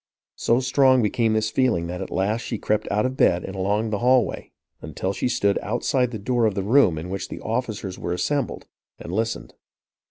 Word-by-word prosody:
So 120 Hz, +2 st, +2 dB
strong 130 Hz, -1 st, +4 dB
became 110 Hz, +1 st, +1 dB
this 110 Hz, 0 st, 0 dB
feeling 120 Hz, -10 st, +1 dB
that 90 Hz, +2 st, -5 dB
at 95 Hz, -, -5 dB
last 105 Hz, +5 st, 0 dB
she 115 Hz, -, -4 dB
crept 105 Hz, +1 st, -1 dB
out 105 Hz, +3 st, +1 dB
of 130 Hz, 0 st, -2 dB
bed 90 Hz, -8 st, +3 dB
and 95 Hz, -, -6 dB
along 105 Hz, +3 st, 0 dB
the 105 Hz, -, -1 dB
hallway, 125 Hz, 0 st, +2 dB, 0.3 s
until 85 Hz, +5 st, -3 dB
she 125 Hz, -, -1 dB
stood 100 Hz, -4 st, +1 dB
outside 125 Hz, +3 st, 0 dB
the 115 Hz, -, -5 dB
door 115 Hz, +2 st, +1 dB
of 105 Hz, -, -2 dB
the 100 Hz, -, -1 dB
room 105 Hz, -, +4 dB
in 85 Hz, +4 st, -6 dB
which 95 Hz, 0 st, -4 dB
the -, -, -7 dB
officers 110 Hz, -5 st, -3 dB
were 85 Hz, -, -4 dB
assembled, 135 Hz, +9 st, -2 dB, 0.3 s
and 85 Hz, -, -8 dB
listened. 115 Hz, +3 st, -2 dB
110 Hz, 200 wpm, -23 LUFS, 95-125 Hz, 0.3 s, strong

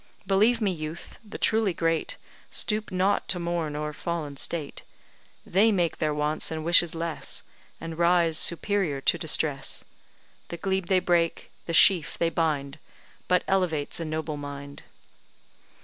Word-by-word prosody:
Believe 215 Hz, +5 st, +3 dB
me, 205 Hz, -3 st, +1 dB
youth, 155 Hz, -1 st, -7 dB
the 210 Hz, -1 st, -9 dB
truly 220 Hz, -5 st, +1 dB
great 165 Hz, -1 st, -1 dB, 0.3 s
Stoop 215 Hz, -1 st, +1 dB
not 185 Hz, +2 st, +1 dB
to 185 Hz, -, +1 dB
mourn 170 Hz, -3 st, -2 dB
o'er 150 Hz, 0 st, -4 dB
fallen 155 Hz, -3 st, -4 dB
state; 150 Hz, +1 st, -2 dB, 0.6 s
They 210 Hz, +5 st, +3 dB
make 175 Hz, -5 st, 0 dB
their 155 Hz, -, 0 dB
wants 150 Hz, +1 st, -1 dB
and 160 Hz, -1 st, -5 dB
wishes 170 Hz, 0 st, +4 dB
less, 165 Hz, -1 st, -1 dB, 0.4 s
And 165 Hz, 0 st, -7 dB
rise 170 Hz, -1 st, +3 dB
superior 170 Hz, -2 st, +1 dB
to 170 Hz, -, +2 dB
distress; 150 Hz, -3 st, 0 dB, 0.6 s
The 170 Hz, -, -6 dB
glebe 190 Hz, -1 st, -2 dB
they 190 Hz, -, +3 dB
break 170 Hz, -2 st, 0 dB, 0.2 s
the 165 Hz, -, -3 dB
sheaf 170 Hz, -1 st, +5 dB
they 165 Hz, 0 st, 0 dB
bind 150 Hz, -4 st, -1 dB, 0.5 s
But 180 Hz, 0 st, +2 dB
elevates 175 Hz, -7 st, 0 dB
a 165 Hz, -, -3 dB
noble 155 Hz, -1 st, -4 dB
mind. 140 Hz, 0 st, -8 dB
165 Hz, 145 wpm, -26 LUFS, 155-185 Hz, 0.6 s, sheaf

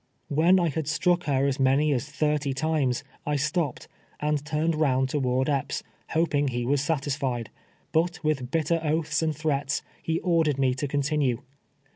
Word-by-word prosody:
AVhen 170 Hz, +6 st, +5 dB
I 170 Hz, -2 st, +2 dB
had 155 Hz, 0 st, -3 dB
struck 175 Hz, +3 st, +1 dB
lier 135 Hz, -1 st, +2 dB
as 140 Hz, -1 st, 0 dB
many 140 Hz, +3 st, +3 dB
as 125 Hz, -, -2 dB
thirt}' 150 Hz, -1 st, 0 dB
times, 140 Hz, -3 st, 0 dB, 0.2 s
I 150 Hz, -, -1 dB
stoj)ped, 150 Hz, -1 st, -1 dB, 0.3 s
and 150 Hz, -1 st, 0 dB
turned 155 Hz, +2 st, 0 dB
round 135 Hz, -4 st, +2 dB
toward 130 Hz, -2 st, 0 dB
Epps, 140 Hz, -3 st, -1 dB, 0.3 s
hoping 155 Hz, -3 st, +1 dB
he 120 Hz, -2 st, -2 dB
was 140 Hz, +2 st, +2 dB
satisfied; 140 Hz, -6 st, -1 dB, 0.4 s
but 170 Hz, +2 st, 0 dB
with 140 Hz, -5 st, 0 dB
bitter 165 Hz, +2 st, +1 dB
oaths 155 Hz, 0 st, 0 dB
and 160 Hz, -1 st, 0 dB
threats, 145 Hz, -2 st, -1 dB, 0.2 s
he 165 Hz, 0 st, -1 dB
ordered 165 Hz, -6 st, +2 dB
me 130 Hz, -2 st, +2 dB
to 135 Hz, +3 st, -3 dB
continue. 140 Hz, -3 st, 0 dB
150 Hz, 160 wpm, -26 LUFS, 135-160 Hz, 0.4 s, AVhen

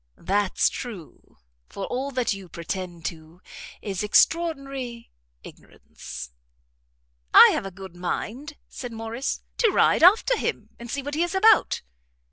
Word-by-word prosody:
"That's 195 Hz, +3 st, +1 dB
true; 215 Hz, -, -8 dB, 0.3 s
for 195 Hz, -, -5 dB
all 265 Hz, +3 st, -3 dB
that 255 Hz, -5 st, 0 dB
you 195 Hz, -2 st, -10 dB
pretend 170 Hz, +1 st, -6 dB
to 160 Hz, +1 st, -7 dB, 0.4 s
is 195 Hz, -3 st, -3 dB
extraordinary 275 Hz, -1 st, 0 dB, 0.3 s
ignorance." 60 Hz, 0 st, -11 dB, 1.0 s
"I -, -, +11 dB
have 195 Hz, -, -2 dB
a -, -, -5 dB
good 190 Hz, -1 st, -11 dB
mind," 240 Hz, -, -5 dB
said 245 Hz, -2 st, -8 dB
Morrice, 225 Hz, +3 st, -4 dB
"to 460 Hz, -, +4 dB
ride -, -, +3 dB
after 420 Hz, +8 st, +6 dB
him, -, -, -3 dB
and 235 Hz, 0 st, -9 dB
see 280 Hz, +4 st, -3 dB
what 290 Hz, +1 st, -5 dB
he 310 Hz, -, 0 dB
is 350 Hz, +2 st, -1 dB
about." 430 Hz, +4 st, +4 dB
230 Hz, 135 wpm, -25 LUFS, 185-280 Hz, 1.0 s, I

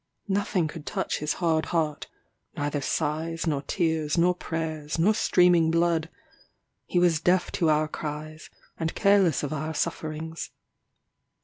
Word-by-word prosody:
Nothing 195 Hz, -3 st, 0 dB
could 155 Hz, 0 st, -9 dB
touch -, -, -2 dB
his 150 Hz, 0 st, -1 dB
hard 160 Hz, -3 st, 0 dB
heart 155 Hz, -3 st, -1 dB, 0.5 s
neither 145 Hz, 0 st, -1 dB
sighs, 160 Hz, +5 st, -2 dB
nor 150 Hz, -4 st, 0 dB
tears, 160 Hz, -1 st, 0 dB
nor 175 Hz, +2 st, +4 dB
prayers, 160 Hz, -3 st, -4 dB
nor 190 Hz, +7 st, +4 dB
streaming 180 Hz, -5 st, +4 dB
blood; 165 Hz, -1 st, +1 dB, 0.8 s
he -, -, -1 dB
was 175 Hz, -3 st, +3 dB
deaf 180 Hz, +2 st, +2 dB
to 165 Hz, -, +1 dB
our 155 Hz, 0 st, +3 dB
cries, 155 Hz, 0 st, -6 dB, 0.3 s
and 165 Hz, 0 st, -2 dB
careless 200 Hz, -6 st, +3 dB
of 145 Hz, -, -2 dB
our 155 Hz, +1 st, -3 dB
sufferings. 160 Hz, +2 st, -3 dB
160 Hz, 135 wpm, -26 LUFS, 155-175 Hz, 0.8 s, nor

